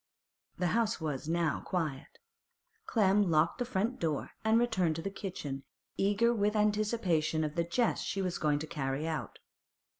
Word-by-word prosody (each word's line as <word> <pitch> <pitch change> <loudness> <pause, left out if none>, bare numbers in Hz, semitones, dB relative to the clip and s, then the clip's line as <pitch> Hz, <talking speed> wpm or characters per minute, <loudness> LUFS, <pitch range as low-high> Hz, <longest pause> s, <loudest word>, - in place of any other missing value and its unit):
The 180 -1 +1
house 230 -1 +1
was 150 -2 -3
now 170 -1 +1
quiet. 155 -7 -3 0.7
Clem 205 -3 +3
locked 160 +7 +2
the 245 - 0
front 235 +2 -1
door 155 -4 -1
and 220 +1 +4
returned 190 -9 +2
to 165 - -4
the 195 - -3
kitchen, 165 -9 -5 0.3
eager 205 +4 +3
with 210 -1 +1
anticipation 205 -7 +1
of 150 -1 -2
the 170 +1 +1
jest 225 +8 0
she 195 - -2
was 185 -2 -1
going 150 -1 +2
to 150 - -4
carry 150 -1 -2
out. 150 -9 -4
180 Hz, 160 wpm, -32 LUFS, 155-210 Hz, 0.7 s, and